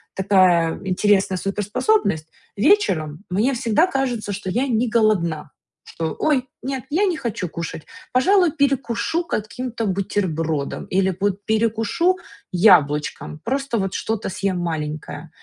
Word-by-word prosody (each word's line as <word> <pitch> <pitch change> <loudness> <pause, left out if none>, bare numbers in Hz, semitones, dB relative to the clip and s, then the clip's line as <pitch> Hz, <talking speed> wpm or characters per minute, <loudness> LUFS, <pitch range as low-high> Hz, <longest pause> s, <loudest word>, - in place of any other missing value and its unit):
такая 185 -4 +3
интересная 190 0 +2
супер-способность, 200 - 0 0.3
вечером, 195 - +2
мне 210 +9 +1
всегда 240 - +2
кажется, 245 - -2
что 190 -1 -5
я 250 +7 0
не 240 -1 +1
голодна, 185 -10 +1 0.3
что: 160 -2 -4
ой, 275 -5 +1 0.2
нет, 265 -1 -3
я 370 +7 +3
не 360 -4 0
хочу 225 - -3
кушать, 165 -1 -6 0.3
пожалуй, 355 +6 +4
перекушу 275 +1 0
каким-то 230 -1 -3
бутербродом 165 -6 -2
или, 190 -1 +1
вот, 200 0 -1
перекушу 225 - +1 0.3
яблочком, 155 -5 +3
просто, 270 0 -1
вот, 195 -1 -2
что-то 220 -1 -2
съем 190 0 -2
маленькое. 155 -2 -4
205 Hz, 120 wpm, -21 LUFS, 175-255 Hz, 0.3 s, пожалуй